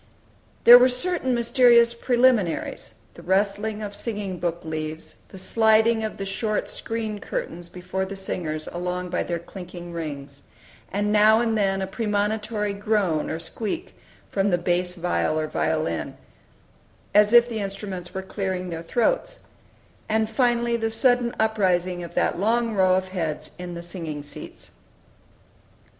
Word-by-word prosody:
There 240 +1 +11
were 250 +1 +5
certain 260 0 0
mysterious 235 -1 +5
preliminaries, 240 -6 +1 0.2
the - - -13
rustling 205 +3 0
of 205 -1 -6
singing 205 -6 -4
book 175 -1 -2
leaves, 155 0 -5
the - - -11
sliding 220 +3 +3
of 215 - -4
the 195 - -4
short 210 +2 -1
screen 220 -2 -4
curtains 175 -3 -5
before 185 +1 -4
the 195 - -6
singers 160 -5 -4
along 180 +1 -3
by - - 0
their 170 - -2
clinking 175 0 -9
rings, 145 -4 -6 0.5
and 205 +1 0
now 215 +1 +6
and 230 -1 +1
then 195 -2 +1
a - - 0
premonitory 210 0 -1
groan 200 -6 0
or - - -2
squeak 225 - -5 0.4
from 195 0 +1
bass 180 0 0
viol 175 -3 0
or 155 - 0
violin, 155 - -2 1.0
as 210 +1 +5
if 240 0 +7
the 230 -2 -4
instruments 195 -3 -5
were 190 - -5
clearing 190 -2 -3
their 165 -1 -4
throats; - - 0 0.7
and 220 0 +1
finally 240 0 +2
the 225 -1 -1
sudden 245 +1 +2
uprising 185 -5 +1
of 170 - -9
that - - +1
long 230 +3 +1
row 185 -2 +4
of 185 0 -1
heads 160 -4 -3
in 180 -1 -6
the 170 - -7
"singing 165 -4 -6
seats." 145 - -10
200 Hz, 145 wpm, -24 LUFS, 175-225 Hz, 1.0 s, There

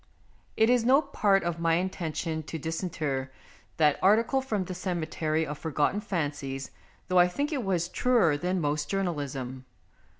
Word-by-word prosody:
It 220 - +5
is 245 -2 +3
no 260 +4 +6
part 205 -8 +2
of 170 -1 -2
my 165 -1 +2
intention 165 -3 -2
to 165 - -4
disinter 155 -5 -3 0.5
that 150 -2 +3
article 225 +7 +4
from 215 -7 -1
the 185 - -6
cemetery 160 -3 -1
of 150 0 -6
forgotten 160 +5 0
fancies, 145 -8 -3 0.4
though 185 0 +3
I 175 - +7
think 285 - -2
it 265 -4 -1
was 180 -4 0
truer 210 -6 +3
than 180 +5 -1
most 150 -1 -1
jour 195 0 0
nalism. 135 -6 -4
170 Hz, 160 wpm, -28 LUFS, 150-195 Hz, 0.5 s, I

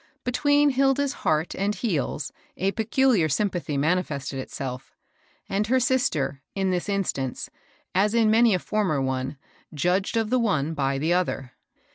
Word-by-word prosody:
Between 290 +3 +3
Hilda's 270 +1 +2
heart 155 +2 +1
and 200 +2 -1
heeU 165 - -2 0.3
a 195 +2 +1
peculiar 225 -5 +2
sympathy 175 -2 -1
manifested 145 -3 -1
itself; 130 -1 -6 0.5
and 205 +2 -1
her 260 +3 +3
sister, 245 - 0
in 190 -1 0
this 180 +2 -2
instance, 170 -10 -2 0.4
as 205 +4 +2
in 225 -2 +4
many 225 -2 +5
a - - +2
former 190 -6 0
one, 130 +1 -2 0.4
judged 180 +8 +1
of 225 0 0
the 255 - +3
one 165 - 0
by 135 -2 0
the 160 +5 +1
other. 170 -8 -1
185 Hz, 145 wpm, -25 LUFS, 145-225 Hz, 0.5 s, many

